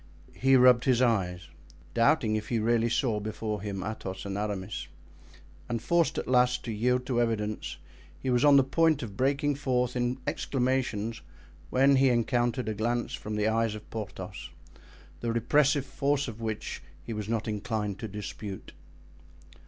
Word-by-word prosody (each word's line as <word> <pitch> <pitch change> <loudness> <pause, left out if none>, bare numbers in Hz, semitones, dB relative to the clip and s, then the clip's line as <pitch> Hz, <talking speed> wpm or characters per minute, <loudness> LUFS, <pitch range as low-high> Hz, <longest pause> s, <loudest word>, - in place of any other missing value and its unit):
He 135 +1 +4
rubbed 125 -1 +6
his 125 -3 +3
eyes, 90 -8 +1 0.5
doubting 115 -2 +3
if 110 0 -3
he 120 - +1
really 115 +1 +2
saw 115 -3 +1
before 105 0 -4
him 100 -2 -4
Athos 100 -3 -5
and 100 -1 -4
Aramis; 100 -2 -3 0.8
and 120 -1 -1
forced 170 +6 +1
at - - -3
last 125 0 +3
to 115 - -3
yield 125 +4 +1
to 120 -2 +1
evidence, 110 -2 -2 0.4
he 130 - -2
was 125 +1 +3
on 145 -1 +7
the 135 - +6
point 155 +1 +2
of 105 -4 -7
breaking 140 +5 +1
forth 125 -3 0
in 125 +1 0
exclamations 130 -6 -1 0.5
when 135 +5 +4
he 135 0 +5
encountered 120 0 +1
a 110 - 0
glance 120 +3 -1
from 105 0 -5
the 105 0 +1
eyes 115 -1 +1
of 105 - -10
Porthos, 110 -3 -6 0.7
the 115 - -1
repressive 140 +4 +2
force 140 +1 0
of 115 -1 -7
which 110 -2 -4 0.2
he 115 - -5
was 105 -1 -5
not 115 -1 -1
inclined 105 -1 -2
to 110 - -4
dispute. 105 -1 -7
115 Hz, 160 wpm, -29 LUFS, 105-130 Hz, 0.8 s, on